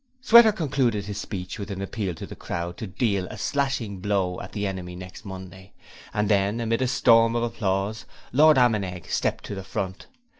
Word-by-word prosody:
Sweater 235 Hz, -2 st, +8 dB
concluded 130 Hz, -, 0 dB
his 105 Hz, 0 st, -5 dB
speech 95 Hz, 0 st, -5 dB
with 100 Hz, 0 st, -5 dB
an 100 Hz, -1 st, -5 dB
appeal 100 Hz, -2 st, -3 dB
to -, -, -7 dB
the -, -, -10 dB
crowd 85 Hz, 0 st, -4 dB
to 110 Hz, -, -5 dB
deal 100 Hz, -1 st, 0 dB
a 110 Hz, -, -8 dB
'Slashing 125 Hz, -5 st, -1 dB
Bow 95 Hz, -2 st, -1 dB
at -, -, -9 dB
the 105 Hz, -1 st, -3 dB
Enemy' 90 Hz, -2 st, -4 dB
next 90 Hz, +3 st, -10 dB
Monday, 95 Hz, 0 st, -9 dB, 0.4 s
and 105 Hz, 0 st, 0 dB
then 100 Hz, +2 st, +2 dB
amid 115 Hz, +1 st, 0 dB
a 130 Hz, -, +2 dB
storm 115 Hz, -2 st, +4 dB
of 120 Hz, -, +1 dB
applause, 105 Hz, -2 st, -1 dB, 0.3 s
Lord 155 Hz, +2 st, +6 dB
Ammenegg 100 Hz, -8 st, +1 dB
stepped -, -, 0 dB
to -, -, -5 dB
the 95 Hz, -1 st, -6 dB
front. 95 Hz, 0 st, -5 dB
100 Hz, 190 wpm, -25 LUFS, 95-115 Hz, 0.4 s, Sweater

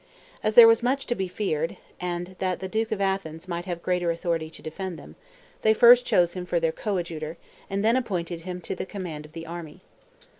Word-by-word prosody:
As 215 Hz, 0 st, 0 dB
there 235 Hz, -1 st, +11 dB
was 225 Hz, +1 st, +5 dB
much 265 Hz, +3 st, 0 dB
to -, -, 0 dB
be 190 Hz, -5 st, -2 dB
feared, 165 Hz, -4 st, -2 dB, 0.2 s
and 175 Hz, +1 st, -4 dB
that 185 Hz, -2 st, -1 dB
the 190 Hz, -, -4 dB
duke 220 Hz, +3 st, -1 dB
of 215 Hz, -, -1 dB
Athens 190 Hz, -4 st, -2 dB
might 175 Hz, -1 st, -4 dB
have 175 Hz, -2 st, -5 dB
greater 180 Hz, -1 st, 0 dB
authority 165 Hz, -1 st, -1 dB
to -, -, -12 dB
defend 180 Hz, +2 st, -5 dB
them, -, -, -12 dB, 0.5 s
they 220 Hz, 0 st, +4 dB
first 245 Hz, +1 st, +7 dB
chose 175 Hz, -1 st, +3 dB
him 180 Hz, -, -4 dB
for 175 Hz, -1 st, 0 dB
their 165 Hz, -1 st, +1 dB
coadjutor, 170 Hz, -5 st, -3 dB, 0.3 s
and 200 Hz, +1 st, -1 dB
then 230 Hz, +2 st, +4 dB
appointed 180 Hz, -9 st, -2 dB
him 180 Hz, +1 st, -6 dB
to -, -, -4 dB
the 190 Hz, -, -5 dB
command 170 Hz, -7 st, -6 dB
of 155 Hz, -, -24 dB
the 165 Hz, 0 st, -7 dB
army. 170 Hz, 0 st, -8 dB
180 Hz, 215 wpm, -26 LUFS, 170-200 Hz, 0.5 s, there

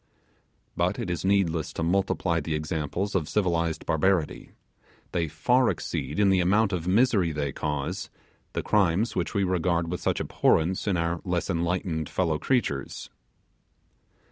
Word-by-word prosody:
But 85 Hz, +2 st, 0 dB
it 115 Hz, -8 st, -3 dB
is 85 Hz, -, -3 dB
needless 95 Hz, -5 st, +1 dB
to -, -, -3 dB
multiply 90 Hz, -1 st, +1 dB
the 80 Hz, 0 st, -2 dB
examples 80 Hz, +5 st, -2 dB
of 85 Hz, -6 st, 0 dB
civilized 85 Hz, -5 st, 0 dB
barbarity; 80 Hz, 0 st, 0 dB, 0.6 s
they 85 Hz, -2 st, 0 dB
far 120 Hz, -, +2 dB
exceed 70 Hz, -, -3 dB
in 100 Hz, -1 st, +4 dB
the 95 Hz, -, +3 dB
amount 100 Hz, +4 st, +3 dB
of 85 Hz, -1 st, -2 dB
misery 100 Hz, -4 st, +3 dB
they 75 Hz, -2 st, -2 dB
cause 80 Hz, +8 st, -3 dB, 0.4 s
the -, -, -2 dB
crimes 100 Hz, +1 st, +2 dB
which 85 Hz, -3 st, -2 dB
we 100 Hz, -, +2 dB
regard 85 Hz, -2 st, 0 dB
with 90 Hz, -, -3 dB
such -, -, 0 dB
abhorrence 90 Hz, +6 st, +1 dB
in 95 Hz, -3 st, +2 dB
our 85 Hz, 0 st, -1 dB
less 90 Hz, +1 st, -1 dB
enlightened 85 Hz, -2 st, -1 dB
fellow 80 Hz, -4 st, 0 dB
creatures. 80 Hz, -, -1 dB
85 Hz, 145 wpm, -26 LUFS, 80-95 Hz, 0.6 s, in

